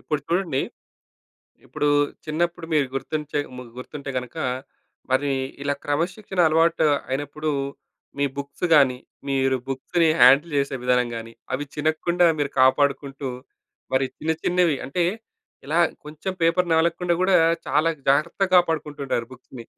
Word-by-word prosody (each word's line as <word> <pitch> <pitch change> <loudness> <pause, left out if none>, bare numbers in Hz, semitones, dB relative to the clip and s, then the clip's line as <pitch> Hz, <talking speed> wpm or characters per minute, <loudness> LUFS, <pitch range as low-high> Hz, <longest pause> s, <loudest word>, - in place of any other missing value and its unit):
ఇప్పుడు 150 -2 -2
చూడండి. 170 -6 0 1.0
ఇప్పుడు 150 - -1 0.4
చిన్నప్పుడు 170 +2 -2
మీరు 145 -3 +3
గుర్తుంచే 150 +2 -3 0.2
ము 125 - -7 0.2
గుర్తుంటే 140 +2 -7
గనుక 125 +4 -9 0.7
మరి 140 +2 +2 0.3
ఇలా 145 0 0
క్రమశిక్షణ 180 +6 -1
అలవాటు 165 +1 +3 0.2
అయినప్పుడు 145 +3 -3 0.7
మీ 140 - +2
బుక్స్ 140 +5 -5
గానీ, 135 -4 +5 0.3
మీరు 135 -1 +2
బుక్స్‌ని 160 +5 +1
హ్యాండిల్ 135 +6 +6
చేసే 140 -1 -1
విధానం 125 -1 +2
గానీ, 115 0 -7 0.2
అవి 140 +3 -1
చినగకుండా 160 +3 +1
మీరు 145 -1 0
కాపాడుకుంటూ, 140 +1 +2 0.6
మరి 130 0 +2
చిన్న 160 +1 -1
చిన్నవి 175 -5 +2
అంటే, 170 +5 0 0.6
ఇలా 155 +4 +1 0.3
కొంచెం 155 +5 -5
పేపర్ 170 +2 +3
నవలకుండా 170 +2 +2
గూడా, 185 0 +4 0.3
చాలా 150 +5 +2 0.2
జాగ్రత్తగా 170 +7 +2
కాపాడుకుంటూ 160 -4 +1
ఉంటారు 115 -3 -1
బుక్స్‌ని. 125 -1 -12
150 Hz, 125 wpm, -23 LUFS, 135-165 Hz, 1.0 s, హ్యాండిల్